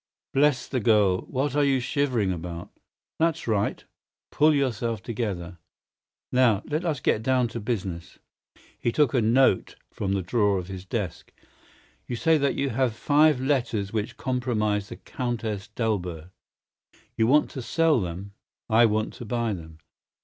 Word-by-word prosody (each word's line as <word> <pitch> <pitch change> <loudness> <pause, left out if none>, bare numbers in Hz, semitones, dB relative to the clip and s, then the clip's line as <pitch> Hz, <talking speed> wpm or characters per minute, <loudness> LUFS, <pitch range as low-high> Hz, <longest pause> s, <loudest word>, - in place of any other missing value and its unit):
Bless 135 -3 +3
the 130 - -1
girl, 105 -5 +3
what 135 +1 -1
are 145 - +3
you 135 -2 +3
shivering 125 -6 0
about? 85 -1 -6 0.5
That's 165 -3 0
right! 105 -2 0 0.5
Pull 155 0 +4
yourself 115 -6 -1
together! 95 -7 -4 0.7
Now, 120 -5 +3
let 155 +3 -2
us 160 -6 -1
get 110 - +1
down 125 0 +2
to 115 - -5
business." 95 -7 -4 0.6
He 120 - 0
took 145 -1 +2
a 125 - +3
note 115 -2 +3 0.2
from 100 -1 -2
the 95 -1 -1
drawer 100 +1 +2
of 90 0 -5
his 95 -1 -7
desk. 95 -4 -4 0.8
"You 120 - -3
say 160 +5 +3
that 140 -1 +1
you 140 -1 -1
have 120 -1 0
five 150 +1 +4
letters 120 -7 -1
which 110 +1 -3
compromise 110 -6 -1
the - - -7
Countess 110 -5 -4
d'Albert. 95 -6 -3 0.8
You 110 -1 +2
want 150 +4 +4
to 130 - -5
sell 160 0 +2
them. 90 +3 -5 0.4
I 115 +1 +6
want 110 0 -1
to 120 - -9
buy 115 0 -1
them. 80 -3 -9
115 Hz, 155 wpm, -26 LUFS, 100-130 Hz, 0.8 s, I